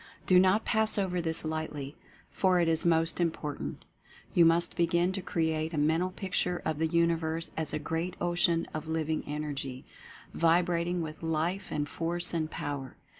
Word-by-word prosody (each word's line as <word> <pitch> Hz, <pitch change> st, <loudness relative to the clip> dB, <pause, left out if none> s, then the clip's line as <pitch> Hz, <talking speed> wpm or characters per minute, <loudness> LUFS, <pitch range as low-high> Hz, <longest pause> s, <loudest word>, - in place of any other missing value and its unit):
Do 180 Hz, -1 st, +6 dB
not 190 Hz, +4 st, +3 dB
pass 220 Hz, 0 st, +2 dB
over 180 Hz, -3 st, 0 dB
this 160 Hz, -1 st, +4 dB
lightly, 155 Hz, -3 st, -4 dB, 0.4 s
for 185 Hz, -2 st, +2 dB
it 170 Hz, -, +2 dB
is 165 Hz, +1 st, +2 dB
most 165 Hz, 0 st, +2 dB
important. 150 Hz, -, -3 dB, 0.5 s
You 170 Hz, -, +6 dB
must 165 Hz, +1 st, +3 dB
begin 170 Hz, +1 st, +2 dB
to 190 Hz, 0 st, -3 dB
create 160 Hz, -1 st, -1 dB
a -, -, -3 dB
Mental 160 Hz, +5 st, +2 dB
Picture 185 Hz, -1 st, -1 dB
of 155 Hz, -1 st, -1 dB
the 160 Hz, -, +2 dB
Universe 165 Hz, 0 st, 0 dB
as 160 Hz, -2 st, -2 dB
a -, -, -1 dB
Great 165 Hz, +4 st, -3 dB
Ocean 175 Hz, -1 st, +2 dB
of 155 Hz, 0 st, -5 dB
Living 160 Hz, -1 st, -1 dB
Energy, 145 Hz, -3 st, -4 dB, 0.5 s
vibrat 170 Hz, +1 st, +2 dB
ing 175 Hz, -1 st, -1 dB
with 155 Hz, -1 st, -7 dB
Life 165 Hz, +4 st, -2 dB
and 145 Hz, -1 st, -1 dB
Force 175 Hz, +3 st, -3 dB
and 160 Hz, -2 st, -1 dB
Power. 140 Hz, -4 st, -5 dB
165 Hz, 170 wpm, -30 LUFS, 155-175 Hz, 0.5 s, Do